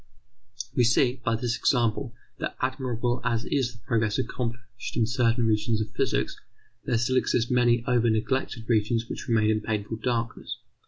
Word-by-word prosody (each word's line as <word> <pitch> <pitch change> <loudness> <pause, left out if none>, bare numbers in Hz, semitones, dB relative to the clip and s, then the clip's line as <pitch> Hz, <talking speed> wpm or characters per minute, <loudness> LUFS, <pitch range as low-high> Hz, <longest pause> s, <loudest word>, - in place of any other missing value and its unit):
We 125 - +4
see, 120 +2 +3
by 115 - +1
this 120 0 -1
example, 120 -1 +1 0.2
that - - -3
admirable 125 -2 -1
as 115 -1 0
is 130 -4 0
the 115 - -16
progress 110 -2 +1
accomplished 120 0 -4
in 115 - +3
certain 120 0 +2
regions 110 +1 +1
of 110 - -3
physics, - - 0 0.5
there 120 - +1
still 130 +3 +1
exist 120 -1 +1
many 120 -1 +3
over 120 -2 +3
neglected 115 +1 -1
regions 115 0 +1
which - - -6
remain 110 -2 +3
in 110 0 0
painful 110 0 -2
darkness. 115 0 -2
115 Hz, 160 wpm, -27 LUFS, 115-125 Hz, 0.5 s, We